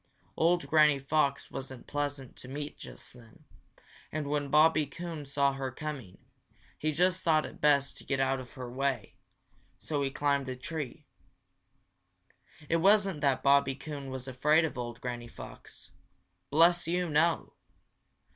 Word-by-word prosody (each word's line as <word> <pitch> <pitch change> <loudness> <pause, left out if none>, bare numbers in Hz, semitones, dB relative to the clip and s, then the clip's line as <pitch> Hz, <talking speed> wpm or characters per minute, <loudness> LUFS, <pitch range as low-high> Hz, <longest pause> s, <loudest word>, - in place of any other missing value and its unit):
Old 170 -2 +2
Granny 150 -1 +5
Fox 140 0 0
wasn't 130 -2 -7
pleasant 145 -3 -3
to - - -8
meet 145 +2 -5
just - - -9
then, 115 -3 -17 0.7
and 155 -1 -2
when 145 0 -1
Bobby 155 0 +5
Coon 160 0 -7
saw 140 0 +2
her 135 -1 -3
coming, 130 - -6 0.6
he 155 - 0
just 180 +4 +2
thought 155 -2 +3
it - - -10
best 140 -2 +3
to - - -12
get 135 -1 -1
out 135 0 +1
of 125 -1 -10
her 125 -1 -7
way, 130 -3 -2 0.6
so 145 -2 -2
he 135 - +1
climbed 140 -1 0
a 130 - -3
tree. 145 0 -6 1.6
It 165 - +2
wasn't 195 -2 +3
that 140 -3 +2
Bobby 140 -1 +4
Coon 140 -1 -7
was 130 0 -6
afraid 150 +5 +3
of 160 - -4
old 120 -1 -5
Granny 120 -1 -4
Fox. - - -12 0.6
Bless 170 +3 +4
you, 180 +1 0
no! 160 +2 +1
140 Hz, 150 wpm, -30 LUFS, 130-155 Hz, 1.6 s, Granny